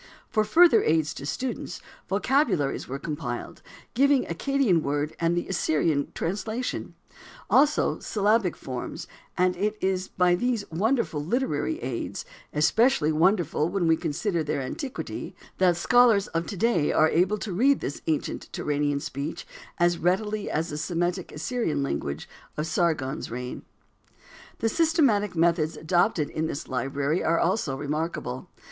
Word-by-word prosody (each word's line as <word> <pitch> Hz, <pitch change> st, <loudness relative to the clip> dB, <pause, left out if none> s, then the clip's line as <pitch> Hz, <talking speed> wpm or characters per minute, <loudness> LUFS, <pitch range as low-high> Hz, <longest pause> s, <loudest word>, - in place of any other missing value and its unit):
For 215 Hz, -, +3 dB
further 330 Hz, 0 st, +6 dB
aids 155 Hz, -1 st, +1 dB
to 140 Hz, -, -7 dB
students, 250 Hz, -, -4 dB, 0.3 s
vocabularies 200 Hz, -, +1 dB
were 135 Hz, -, -4 dB
compiled, 140 Hz, -5 st, -5 dB, 0.3 s
giving 280 Hz, +1 st, +4 dB
the -, -, -4 dB
Accadian 245 Hz, -, +2 dB
word 145 Hz, +1 st, -2 dB
and 170 Hz, +1 st, +1 dB
the 175 Hz, -, -2 dB
Assyrian 155 Hz, -5 st, 0 dB
translation; 215 Hz, +7 st, -3 dB, 0.6 s
also, 295 Hz, +2 st, +3 dB
syllabic 210 Hz, -3 st, +1 dB
forms, 130 Hz, -2 st, -6 dB, 0.3 s
and 180 Hz, 0 st, +2 dB
it 210 Hz, +3 st, -1 dB
is 190 Hz, 0 st, 0 dB
by 180 Hz, -1 st, +2 dB
these 230 Hz, +2 st, 0 dB
wonderful 200 Hz, -, 0 dB
literary 265 Hz, -, -1 dB
aids, -, -, -4 dB, 0.3 s
especially 160 Hz, -, +3 dB
wonderful 165 Hz, -1 st, +2 dB
when 190 Hz, -2 st, 0 dB
we 165 Hz, -, +5 dB
consider 165 Hz, +2 st, -1 dB
their 150 Hz, -1 st, -2 dB
antiquity, 260 Hz, -, -5 dB, 0.2 s
that 180 Hz, -2 st, +4 dB
scholars 230 Hz, 0 st, +5 dB
of 165 Hz, +1 st, -2 dB
to 200 Hz, -, -5 dB
day 175 Hz, -7 st, +2 dB
are 155 Hz, -, +4 dB
able 185 Hz, +6 st, +2 dB
to 205 Hz, -2 st, -5 dB
read 265 Hz, +9 st, +3 dB
this 140 Hz, -, -5 dB
ancient 155 Hz, -2 st, -2 dB
Turanian 145 Hz, -1 st, -1 dB
speech 140 Hz, +4 st, -5 dB, 0.3 s
as 175 Hz, 0 st, +2 dB
readily 210 Hz, +4 st, 0 dB
as 160 Hz, +3 st, -1 dB
the 150 Hz, -, -4 dB
Semitic 175 Hz, +2 st, -2 dB
Assyrian 160 Hz, -, -1 dB
language 70 Hz, -, -3 dB, 0.3 s
of 150 Hz, -, -1 dB
Sargon's 160 Hz, -5 st, -1 dB
reign. 125 Hz, +1 st, -5 dB, 1.0 s
The 225 Hz, -, +2 dB
systematic 270 Hz, -, +2 dB
methods 165 Hz, -1 st, +2 dB
adopted 170 Hz, -1 st, +1 dB
in 160 Hz, +1 st, -1 dB
this 140 Hz, -, -5 dB
library 140 Hz, +6 st, -1 dB
are 165 Hz, +1 st, +2 dB
also 170 Hz, -7 st, 0 dB
remarkable. 145 Hz, -3 st, -3 dB
175 Hz, 140 wpm, -26 LUFS, 150-215 Hz, 1.0 s, further